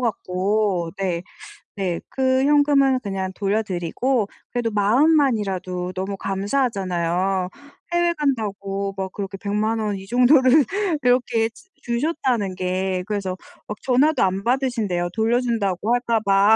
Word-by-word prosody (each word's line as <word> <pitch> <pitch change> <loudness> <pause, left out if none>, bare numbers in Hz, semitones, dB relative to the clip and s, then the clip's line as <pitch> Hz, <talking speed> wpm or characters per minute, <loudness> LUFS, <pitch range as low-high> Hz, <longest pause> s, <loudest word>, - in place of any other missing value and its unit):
같고 195 -4 0
네. 180 -3 -2 0.5
네. 185 -4 -2
그 260 0 +1
현금은 285 -2 +4
그냥 195 -4 -3
돌려드리고 205 +4 -1 0.2
그래도 240 -2 -1
마음만이라도 205 - +1
너무 190 +2 -3
감사하잖아요 190 -4 -1 0.4
해외 345 0 +2
간다고 200 -9 -2
막 190 -1 -3
그렇게 195 -1 -5
1,000,000 210 +3 -1
원 210 -2 -1
이 190 - -9
정도를 255 +5 +5 0.4
그렇게 245 -2 +2
주 235 +11 -20
주셨다는 240 - -1
게. 185 0 -1
그래서 200 -3 -2 0.3
막 210 - -5
전화도 270 +3 +3
안 190 +1 0
받으신대요 230 -9 0
돌려준다고 225 -3 +1
할까 240 -2 +1
봐. 200 +1 +4
210 Hz, 275 characters per minute, -22 LUFS, 190-250 Hz, 0.5 s, 정도를